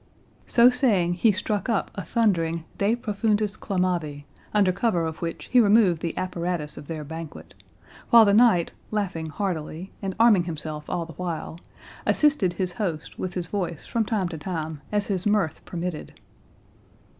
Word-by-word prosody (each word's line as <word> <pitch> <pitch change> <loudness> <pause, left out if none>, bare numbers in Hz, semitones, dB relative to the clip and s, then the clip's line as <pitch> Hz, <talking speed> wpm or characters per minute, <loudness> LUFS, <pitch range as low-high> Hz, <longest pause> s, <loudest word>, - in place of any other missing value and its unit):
So 240 +1 +6
saying, 210 -10 +2
he 210 +5 +4
struck 205 +2 -2
up 225 -4 0
a 200 - -5
thundering 170 -4 +1 0.2
"De 205 +3 +3
profundis 215 -2 0
clamavi", 175 -7 -2 0.3
under 200 -3 +3
cover 180 -4 0
of 160 0 -5
which 165 -1 -4
he 250 - +7
removed 205 -6 +4
the 170 - -3
apparatus 175 -4 -3
of 145 - -10
their 160 -2 -5
banquet: 160 +1 -8 0.6
while 230 -1 +8
the 200 - +4
knight, 215 -6 +5 0.2
laughing 185 -7 -2
heartily, 170 0 -4
and 190 -2 -3
arming 215 -6 +5
himself 155 -2 -5
all 170 - -2
the 165 - -11
while, 165 -1 -5 0.5
assisted 285 - +3
his 180 0 -2
host 170 -8 -4
with 185 -1 -4
his 180 -2 -2
voice 175 -3 -4
from 230 - 0
time 205 -4 -1
to 165 -3 -6
time 160 -3 -4
as 205 -1 +1
his 190 -1 -1
mirth 195 -7 +1
permitted. 175 -2 -5
180 Hz, 160 wpm, -25 LUFS, 165-210 Hz, 0.6 s, while